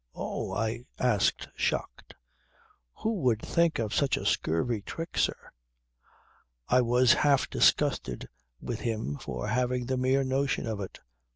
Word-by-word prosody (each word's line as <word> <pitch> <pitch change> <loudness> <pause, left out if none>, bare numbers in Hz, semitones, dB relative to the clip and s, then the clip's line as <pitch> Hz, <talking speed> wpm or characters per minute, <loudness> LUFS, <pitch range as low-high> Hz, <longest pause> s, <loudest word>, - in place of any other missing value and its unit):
"Oh!" - - -4
I 115 +4 -2
asked 120 -6 +1
shocked, - - -3 0.9
"who 225 - +1
would 120 -4 +2
think 170 +4 +1
of 110 -2 -2
such 140 -2 +2
a - - -5
scurvy 105 +8 0
trick, 165 +10 -6
sir?" - - -1 1.2
I 125 +1 +4
was 125 0 +5
half 140 -2 +3
disgusted - - +2 0.3
with 115 - -4
him 110 -11 -2
for - - -5
having 125 +1 0
the 130 +1 -1
mere 130 +2 +2
notion 135 +1 0
of 110 -3 -3
it. 95 - -8
125 Hz, 135 wpm, -29 LUFS, 110-130 Hz, 1.2 s, was